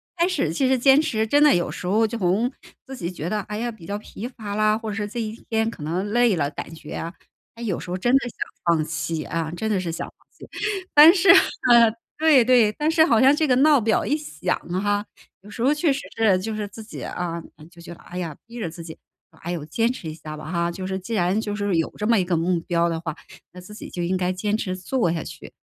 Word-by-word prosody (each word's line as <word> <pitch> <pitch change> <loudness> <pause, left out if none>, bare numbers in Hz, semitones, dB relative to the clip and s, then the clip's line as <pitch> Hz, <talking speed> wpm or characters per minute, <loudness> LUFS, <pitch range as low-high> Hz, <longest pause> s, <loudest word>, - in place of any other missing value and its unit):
开 340 - +2
始 165 - -1
其 260 +8 +1
实 260 -1 +2
坚 270 +4 +6
持 220 -7 -1
真 290 +6 +4
的 300 - +6
有 175 - 0
时 - - -7
候 215 +5 +2
就 230 +2 -5
从 200 +5 +1 0.4
自 265 - -7
己 175 -6 -4
觉 170 -2 -5
得， 210 +1 -1
哎 210 +1 -6
呀， 240 +2 -2
比 220 -8 -11
较 200 +3 -3
疲 210 +1 -9
乏 220 -5 -6
啦， 215 0 +2
或 225 -1 -6
者 205 - -4
是 210 - -2
这 210 +3 -6
一 215 -1 -3 0.2
天 225 0 +1
可 190 - -9
能 175 +6 -2
累 235 -6 +3
了， 145 -2 0
感 165 - -7
觉 160 -2 -10
啊， 165 +1 -5 0.4
它 230 - -11
有 210 -7 -2
时 - - -9
候 180 - -2
真 240 +7 +1
的 - - +6
想 - - -18 0.3
放 170 -2 +2
弃， 155 0 -3
啊， 165 -1 -3
真 220 +6 -3
的 205 -3 +1
是 170 - -3
想 165 - -5
放 - - -20
弃。 - - -14 0.5
但 305 +3 +9
是， 390 +1 +2
嗯， 235 - +5 0.2
对 305 -5 +5
对， 245 -4 +5
但 300 +8 -1
是 320 0 +5
好 235 -8 +3
像 270 +4 +6
这 310 +1 +1
个 260 - +3
闹 285 -1 +5
表 220 +1 +1
一 295 - +1
响 185 - -3 0.2
哈， 205 0 0 0.4
有 205 - -15
时 220 +3 -8
候 270 +5 +4
确 300 0 +1
实 275 - -1 0.2
是 215 -5 +3
就 215 +3 -4
是 210 -1 -3
自 220 +2 -10
己 215 - -9
啊， 170 -1 -4 0.2
哎， 155 - -14
就 170 -1 -16
觉 170 - -9
得， - - -16
哎 180 - -10
呀， 170 -4 -3
逼 235 0 -8
着 175 - -2
自 170 +1 -10
己， 165 -1 -9 0.3
唉 175 - -7
呦， 160 -4 -4
坚 225 +10 0
持 170 -10 -7
一 - - -6
下 155 -1 -9
吧 155 +1 -8
哈， 170 0 -1
就 185 +1 -6
是 190 - -2
既 195 +5 -6
然 185 0 +1
就 210 -2 -4
是 205 -2 -1
有 165 -1 0
这 210 - -2
么 230 0 +4
一 185 - +2
个 175 -2 0
目 170 +1 0
标 170 0 +1
的 165 - -2
话， 160 -2 -4 0.4
那 180 - -11
自 195 +4 -12
己 - - -9
就 175 - -5
应 185 +2 0
该 180 0 0
坚 205 +3 -1
持 185 -4 -3
做 185 0 0
下 165 -2 -3
去， - - -10
205 Hz, 290 characters per minute, -23 LUFS, 170-235 Hz, 0.5 s, 但